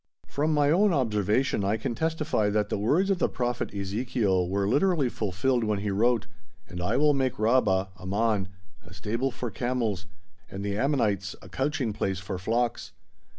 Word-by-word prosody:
From 150 +3 0
my 145 -1 +3
own 195 +3 +4
observation 110 - +1
I 100 +3 +1
can 110 - -3
testify 155 -7 0
that 105 0 0
the - - -1
words 165 - +2
of 190 - +1
the - - +2
Prophet 120 -1 -2
Ezekiel 100 -2 0
were 100 +1 0
literally 145 - +2
fulfilled 115 +4 0
when 105 -1 0
he 100 0 -2
wrote: 115 +2 +2 0.4
"And 90 0 -6
I 90 - 0
will 150 0 +4
make 130 -2 0
Rabbah 105 -4 +2
(Ammon) 100 +1 0 0.4
a 85 0 -14
stable 115 +8 -1
for 120 -2 -5
camels, 115 -6 -2 0.4
and 100 +1 -6
the 100 0 -1
Ammonites 105 -6 0
a - - -12
couching 135 -5 -1
place 95 -3 -1
for 95 0 -5
flocks." 115 +5 -1
110 Hz, 170 wpm, -27 LUFS, 100-130 Hz, 0.4 s, own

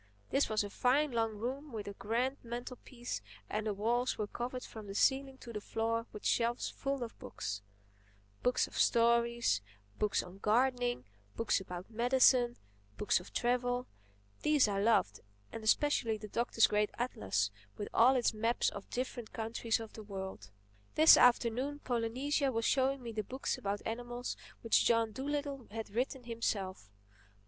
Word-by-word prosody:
This 275 -3 +2
was 215 -1 +1
a 205 - -5
fine 275 +6 +2
long 225 -2 0
room 270 +6 -4
with 210 -3 -5
a 200 - -5
grand 240 +7 -1
mantlepiece 240 - -6 0.3
and 215 +1 -2
the 210 - 0
walls 240 +5 0
were 215 - -1
covered 245 +4 -5
from 220 -2 -9
the 195 - -7
ceiling 270 +3 +2
to 235 -3 -10
the 210 - -4
floor 230 +2 -1
with 210 - -9
shelves 235 0 +1
full 275 -2 -2
of 230 - -8
books: 105 0 -5 0.8
books 250 - +2
of - - -13
stories, 235 - +3 0.4
books 210 -1 +1
on 180 +2 -12
gardening, 245 - +1 0.3
books 230 - +1
about 180 +2 -8
medicine, 245 +1 +4 0.4
books 210 - +2
of 180 - -13
travel; 245 +1 0 0.6
these 300 -6 +4
I 200 -1 0
loved—and 105 - -1
especially 230 -1 +2
the 210 0 -8
Doctor's 235 0 +3
great 210 0 +2
atlas 100 - -1 0.3
with 205 - -4
all 255 +4 +6
its 245 -3 +2
maps 230 +3 +1
of 200 - -8
the - - -6
different 245 -2 -4
countries 225 0 -1
of 225 -1 -8
the 220 - -8
world. 190 - -7 0.5
This 315 +1 +9
afternoon 245 +3 +3
Polynesia 260 +4 0
was 230 -1 -1
showing 270 0 +2
me 235 - -5
the 215 -1 -2
books 260 +6 -3
about 200 +1 -3
animals 240 +2 -4 0.3
which 230 - +4
John 230 -1 +3
Dolittle 280 +1 -3
had 220 0 -6
written 250 +4 -2
himself. 200 - -3
235 Hz, 160 wpm, -33 LUFS, 210-250 Hz, 0.8 s, This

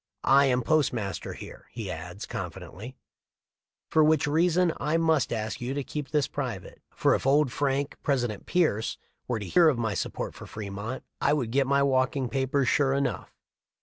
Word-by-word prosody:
I 135 +3 +5
am 125 -1 +2
postmaster 120 -9 0
here," - - -11
he 110 -6 -5
adds, 90 +5 -7
confidentially, 120 +7 -7 1.0
"for 155 - +5
which 155 -1 +4
reason 170 +3 +3
I 150 +3 0
must 160 -3 +2
ask 110 0 -3
you 125 +3 -3
to 145 - -2
keep 145 0 -5
this 150 -3 +1
private, - - -5
for - - +2
if - - -1
old 145 -1 +4
Frank 140 +1 -1
(President 120 -7 -1
Pierce) 155 - +1 0.3
were 120 - 0
to 105 - -5
hear 170 - +5
of 140 - 0
my 110 -3 -1
support - - -4
of - - -9
Fremont 105 +4 -5 0.2
I 140 - +3
would 125 -7 -1
get 135 +1 +2
my 140 0 +3
walking 130 -1 +1
papers 135 0 0
sure 135 -2 +3
enough." 135 -4 -2
135 Hz, 175 wpm, -27 LUFS, 115-150 Hz, 1.0 s, I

